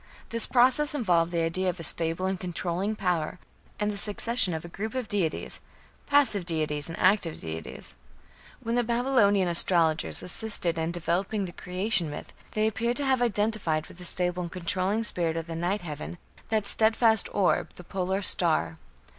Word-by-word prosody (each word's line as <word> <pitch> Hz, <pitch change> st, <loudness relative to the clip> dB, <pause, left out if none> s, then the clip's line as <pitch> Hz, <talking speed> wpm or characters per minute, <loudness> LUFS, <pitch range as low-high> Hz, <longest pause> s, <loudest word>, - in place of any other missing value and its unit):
This 230 Hz, -1 st, +3 dB
process 260 Hz, +5 st, +3 dB
involved 175 Hz, -10 st, +2 dB
the 170 Hz, -1 st, 0 dB
idea 185 Hz, +3 st, 0 dB
of 180 Hz, -, -4 dB
a -, -, -6 dB
stable 165 Hz, +3 st, 0 dB
and 190 Hz, -1 st, -1 dB
controlling 180 Hz, +3 st, -2 dB
power, 180 Hz, -5 st, -1 dB, 0.4 s
and 210 Hz, 0 st, 0 dB
the 200 Hz, -, -4 dB
succession 210 Hz, 0 st, +2 dB
of 160 Hz, -, -5 dB
a -, -, -6 dB
group 215 Hz, +7 st, -5 dB
of 255 Hz, -3 st, -2 dB
deities 185 Hz, -7 st, -2 dB, 0.5 s
passive 280 Hz, -9 st, +3 dB
deities 155 Hz, -3 st, -1 dB
and 165 Hz, -, -6 dB
active 185 Hz, -4 st, +2 dB
deities. 80 Hz, -1 st, -7 dB, 0.7 s
When 230 Hz, -, -2 dB
the 245 Hz, 0 st, +2 dB
Babylonian 235 Hz, -5 st, +3 dB
astrologers 170 Hz, -2 st, +2 dB
assisted 180 Hz, -4 st, -1 dB
in 160 Hz, +1 st, -1 dB
developing 185 Hz, +4 st, -1 dB
the 175 Hz, -, -6 dB
Creation 180 Hz, -1 st, 0 dB
myth, 150 Hz, -, -8 dB, 0.2 s
they 215 Hz, 0 st, +1 dB
appear 235 Hz, +2 st, 0 dB
to 285 Hz, -, -1 dB
have 260 Hz, -2 st, +2 dB
identified 205 Hz, -8 st, 0 dB
with 175 Hz, -, -14 dB
the -, -, -8 dB
stable 180 Hz, 0 st, 0 dB
and 170 Hz, -1 st, -5 dB
controlling 185 Hz, +4 st, -1 dB
spirit 170 Hz, -6 st, 0 dB
of 165 Hz, -, -3 dB
the 165 Hz, -1 st, -6 dB
night 180 Hz, +5 st, -1 dB
heaven 155 Hz, +1 st, -6 dB, 0.3 s
that 215 Hz, -2 st, +1 dB
steadfast 220 Hz, +1 st, +3 dB
orb 195 Hz, -3 st, +1 dB
the 180 Hz, -, -11 dB
Polar 190 Hz, +2 st, -2 dB
Star. 165 Hz, -3 st, +1 dB
185 Hz, 170 wpm, -27 LUFS, 170-220 Hz, 0.7 s, This